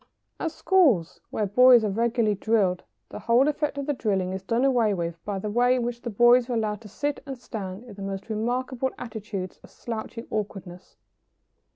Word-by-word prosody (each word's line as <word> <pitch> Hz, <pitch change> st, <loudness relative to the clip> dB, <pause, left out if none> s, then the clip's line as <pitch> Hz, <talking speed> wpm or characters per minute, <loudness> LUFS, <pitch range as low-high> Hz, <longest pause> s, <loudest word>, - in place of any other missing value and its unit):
] -, -, -50 dB
At 330 Hz, -, -2 dB
schools 310 Hz, -, +2 dB
where 215 Hz, -, -1 dB
boys 245 Hz, +3 st, +6 dB
are 210 Hz, -, 0 dB
regularly 230 Hz, 0 st, +1 dB
drilled 200 Hz, -3 st, +1 dB, 0.3 s
the -, -, -7 dB
whole 240 Hz, +4 st, +3 dB
effect 300 Hz, -1 st, -1 dB
of 280 Hz, -, -3 dB
the 290 Hz, -, 0 dB
drilling 195 Hz, -7 st, -1 dB
is 190 Hz, -, -4 dB
done 230 Hz, +7 st, 0 dB
away 235 Hz, -6 st, +3 dB
with 170 Hz, -1 st, -4 dB
by 205 Hz, -1 st, -2 dB
the 210 Hz, +2 st, -4 dB
way 245 Hz, +3 st, +3 dB
in 250 Hz, -, -1 dB
which 240 Hz, 0 st, -4 dB
the 240 Hz, -, -4 dB
boys 240 Hz, +3 st, +5 dB
are -, -, -1 dB
allowed 210 Hz, -2 st, -1 dB
to 220 Hz, -, -11 dB
sit 290 Hz, +7 st, -3 dB
and 270 Hz, -1 st, -5 dB
stand 205 Hz, -4 st, -7 dB
in 245 Hz, -, -12 dB
the 200 Hz, -, -11 dB
most 195 Hz, 0 st, -5 dB
remarkable 245 Hz, +4 st, -1 dB
attitudes 210 Hz, -5 st, -6 dB
of -, -, -15 dB
slouching 230 Hz, 0 st, -6 dB
awkwardness. 195 Hz, -4 st, -6 dB
225 Hz, 200 wpm, -26 LUFS, 200-250 Hz, 0.3 s, boys